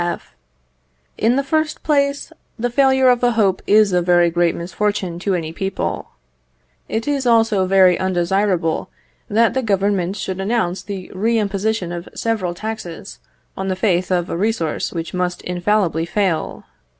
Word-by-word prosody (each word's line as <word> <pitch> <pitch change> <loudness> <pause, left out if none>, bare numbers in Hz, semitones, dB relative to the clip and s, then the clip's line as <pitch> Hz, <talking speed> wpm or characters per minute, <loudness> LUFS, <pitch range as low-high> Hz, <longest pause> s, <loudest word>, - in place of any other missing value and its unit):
F. 175 0 -4 0.8
In 230 +3 +2
the 275 - +1
first 310 +2 -1
place, 280 -2 0 0.2
the 245 +1 -2
failure 265 0 +4
of 245 -1 +4
a 240 -1 +3
hope 200 -4 +2
is 210 -2 +5
a 180 - +3
very 175 -1 +3
great 175 0 +1
misfortune 185 0 -2
to 195 +1 0
any 160 -2 -4
people. 195 +3 -3 0.8
It 225 +3 -2
is 280 -3 0
also 225 -5 +3
very 185 -2 +5
undesirable 185 -2 0 0.4
that 225 +2 +3
the 260 - 0
Government 195 -4 0
should 190 -2 -4
announce 195 -3 -1
the 195 -3 -7
re 225 +5 +1
imposition 205 -2 -1
of 175 0 -6
several 210 -7 -1
taxes 200 -3 -7 0.4
on 190 - -4
the 190 - 0
faith 185 -2 +1
of 175 -1 +1
a - - -1
resource 195 -5 -1
which 165 -2 -5
must 180 -1 -2
infallibly 175 -2 0
fail. 185 -5 -1
195 Hz, 155 wpm, -19 LUFS, 175-225 Hz, 0.8 s, is